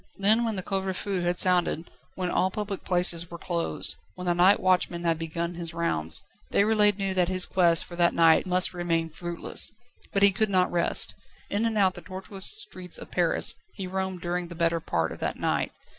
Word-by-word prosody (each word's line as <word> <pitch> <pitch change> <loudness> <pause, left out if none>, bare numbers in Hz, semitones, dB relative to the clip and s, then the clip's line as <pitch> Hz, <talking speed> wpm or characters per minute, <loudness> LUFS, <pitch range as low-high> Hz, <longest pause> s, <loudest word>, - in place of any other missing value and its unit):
Then 215 +4 +3
when 225 -2 -1
the 185 - -4
couvre 190 -1 -2
feu 195 -1 -2
had 175 0 -1
sounded, 175 -2 +1 0.2
when 180 -1 -2
all 185 - +2
public 205 0 -5
places 175 -2 +4
were 170 - -8
closed, 170 0 -3 0.2
when 180 - -7
the 175 - +2
night 180 +3 +5
watchman 180 -2 +1
had 165 -1 0
begun 170 +1 -3
his 170 -1 -6
rounds, 80 - -1 0.3
Déroulède 210 -1 +3
knew 195 -2 -1
that 180 -2 +2
his 185 0 +2
quest 170 -3 +2
for 175 - -10
that 170 0 +2
night 165 +1 +4
must 185 0 +2
remain 165 -2 -1
fruitless. 170 +1 +1 0.4
But 195 - +1
he 200 - +7
could 215 +2 0
not 185 -2 +2
rest. 170 -1 0 0.4
In 205 +3 +1
and 225 -1 0
out 190 -2 +3
the - - -9
tortuous 190 0 -5
streets 295 - -3
of - - -11
Paris 175 -2 +1 0.2
he 195 - -5
roamed 190 -1 -3
during 175 0 -2
the 170 - -10
better 165 0 +1
part 80 - -1
of - - -8
that - - -3
night. - - -1
180 Hz, 205 wpm, -26 LUFS, 170-195 Hz, 0.4 s, he